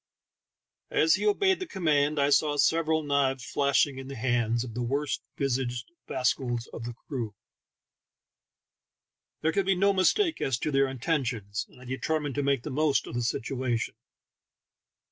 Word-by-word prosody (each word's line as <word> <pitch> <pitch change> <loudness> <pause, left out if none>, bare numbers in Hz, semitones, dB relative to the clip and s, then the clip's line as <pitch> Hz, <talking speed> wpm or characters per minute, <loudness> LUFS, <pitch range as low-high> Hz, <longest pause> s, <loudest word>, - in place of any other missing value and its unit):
As 160 +1 +4
he 210 +2 +1
obeyed 380 - +3
the 370 - -4
command 155 - +1
I 140 +1 +3
saw 145 +1 +3
several 160 +1 +2
knives 135 -3 +1
flashing 140 -1 +2
in 135 - -8
the 135 - -6
hands 120 -1 +1
of 120 -3 -7
the 125 - -3
worst 140 +4 -1 0.2
visaged 125 -1 -1 0.2
rascals 125 -2 0
of 115 - -6
the 120 0 -5
crew. 115 -6 -5 2.1
There 160 - +2
could 195 +2 0
be 195 - +4
no 200 +2 +3
mistake 320 - +2
as 130 -3 +1
to 150 - -2
their 135 -1 +3
intentions, 125 - -2
and - - -18
I 125 - -13
determined 145 +3 -2
to 145 - -1
make 140 -3 +1
the - - -5
most 145 -1 +2
of - - -8
the 120 - -1
situation. 120 0 -1
135 Hz, 160 wpm, -28 LUFS, 125-155 Hz, 2.1 s, As